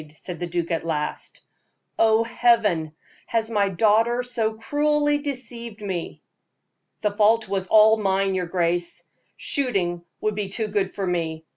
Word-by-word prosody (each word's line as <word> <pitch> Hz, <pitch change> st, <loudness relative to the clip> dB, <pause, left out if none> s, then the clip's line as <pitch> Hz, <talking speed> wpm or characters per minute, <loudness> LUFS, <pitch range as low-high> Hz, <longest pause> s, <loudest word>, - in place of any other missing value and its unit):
said 175 Hz, +1 st, -8 dB
the 175 Hz, -, -3 dB
duke, 170 Hz, 0 st, -2 dB
at 165 Hz, -, -1 dB
last. 150 Hz, -2 st, -4 dB, 0.6 s
"Oh, 220 Hz, 0 st, +4 dB
Heaven! 220 Hz, -9 st, +2 dB, 0.3 s
has 225 Hz, 0 st, -1 dB
my 205 Hz, -2 st, +2 dB
daughter 225 Hz, +5 st, +2 dB
so 230 Hz, -3 st, -1 dB
cruelly 295 Hz, +4 st, +1 dB
deceived 240 Hz, -6 st, -6 dB
me?" 190 Hz, -5 st, -5 dB, 0.8 s
"The 210 Hz, -, +1 dB
fault 220 Hz, +2 st, +3 dB
was 190 Hz, -1 st, -2 dB
all 220 Hz, +1 st, +6 dB
mine, 195 Hz, -1 st, +1 dB
your 180 Hz, -2 st, -1 dB
grace; 175 Hz, 0 st, -1 dB, 0.3 s
shooting 190 Hz, -, -1 dB, 0.2 s
would 215 Hz, -, -1 dB
be 200 Hz, -1 st, -3 dB
far 195 Hz, -, -5 dB
too 220 Hz, -2 st, -1 dB
good 200 Hz, -2 st, 0 dB
for 195 Hz, -, -4 dB
me. 165 Hz, -3 st, -2 dB
210 Hz, 150 wpm, -24 LUFS, 180-230 Hz, 0.8 s, all